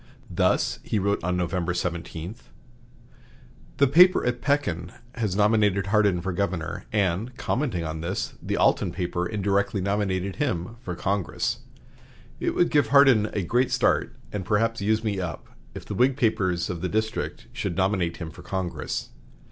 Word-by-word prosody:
Thus - - +1
he - - -2
wrote 100 -1 0
on 90 +1 0
November 90 0 -1
17: 85 0 -4 1.4
"The 140 - +5
paper 180 +7 +6
at 120 0 -1
Pekin 90 - 0 0.2
has 110 -6 -2
nominated 105 -2 +3
Hardin 100 -3 +2
for 95 +1 -3
governor, 85 -4 -2
and, 105 +4 0
commenting 120 - -1
on 80 0 -4
this, 90 +4 -3
the - - -2
Alton - - +3
paper 90 0 -2
indirectly 100 0 0
nominated 95 -1 -1
him 115 - -2
for 90 -8 -5
Congress. 95 +2 -1 0.8
It - - -1
would 175 - +3
give 145 -2 +3
Hardin 135 -7 +6
a 100 - -1
great 125 +8 +2
start, - - +1 0.2
and 100 -2 -2
perhaps 115 +4 +1
use 110 +2 +1
me 105 -3 -1
up, 90 -3 -5 0.3
if - - -8
the - - -5
Whig 130 +2 +3
papers 95 -8 +1
of 85 -2 -5
the 90 - -1
district 110 +2 -2
should 85 - -3
nominate 95 -3 +1
him 85 -3 -6
for 90 - -12
Congress. 90 -5 -3
100 Hz, 155 wpm, -25 LUFS, 90-110 Hz, 1.4 s, paper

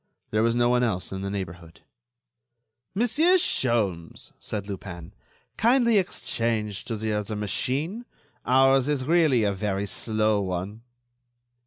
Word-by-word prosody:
There 110 - +2
was 115 +1 +2
no 120 0 +3
one 125 0 +3
else 105 -7 -1
in 95 0 -4
the 100 - -3
neighborhood. 85 -4 -7 1.1
"Monsieur 295 - +3
Sholmes," 105 - -1
said 105 -3 -5
Lupin, 90 -4 -8 0.4
"kindly 235 -1 +4
exchange 115 - -2
to 115 - -3
the 110 0 -2
other 105 +1 -2
machine. 140 - -2 0.4
Ours 135 +2 +4
is 140 -3 0
really 155 -7 +3
a 100 -1 +1
very 100 0 -2
slow 110 0 0
one." 95 +3 -4
110 Hz, 130 wpm, -25 LUFS, 100-135 Hz, 1.1 s, kindly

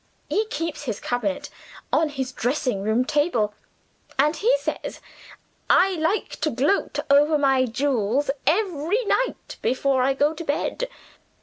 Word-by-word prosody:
He 435 +1 +1
keeps 330 -9 -4
his 225 -5 -3
cabinet 220 -6 -2 0.4
on 320 - +3
his 265 -3 -4
dressing 250 -4 -1
room 220 +5 +1
table; 260 -9 +1 0.6
and 300 +4 +3
he 430 +10 +2
says, - - -4 0.7
'I 375 +2 +6
like 325 +7 0
to 310 - +2
gloat 280 +11 0
over 295 +2 +5
my 270 -2 +3
jewels, 255 +1 0 0.2
every 370 +4 +1
night, - - -1
before 260 +1 +1
I 265 +1 +2
go 290 +3 +2
to 320 - -7
bed. 330 +11 -2
285 Hz, 135 wpm, -24 LUFS, 255-325 Hz, 0.7 s, I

